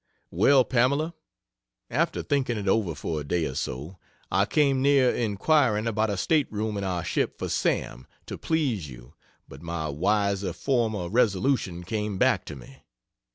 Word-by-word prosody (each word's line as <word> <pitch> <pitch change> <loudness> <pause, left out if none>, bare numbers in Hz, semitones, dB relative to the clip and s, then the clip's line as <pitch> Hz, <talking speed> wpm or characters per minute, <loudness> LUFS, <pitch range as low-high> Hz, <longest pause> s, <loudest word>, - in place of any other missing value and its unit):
Well, 130 +9 +4
Pamela, 140 +7 +1 0.8
after - - 0
thinking 130 -5 0
it 100 -1 -4
over 95 -5 +1
for 75 +1 -3
a - - -5
day 80 +3 -1
or 65 - -4
so, 75 +9 -5 0.3
I 95 +2 +3
came 140 +1 +2
near 135 -2 +4
inquiring 115 +1 +1
about 110 -1 0
a 100 - -2
state 150 - +1
room 110 0 -2
in 100 - -3
our 90 -3 -2
ship - - -1
for - - -4
Sam, 65 +2 -1 0.2
to - - -6
please 130 - -1
you, - - -13 0.3
but 70 - -12
my 85 -2 -4
wiser 100 +4 0
former 110 - -1
resolution 100 -3 +1
came 105 +1 -3
back - - +2
to - - -7
me. 65 0 -14
105 Hz, 160 wpm, -26 LUFS, 85-125 Hz, 0.8 s, Well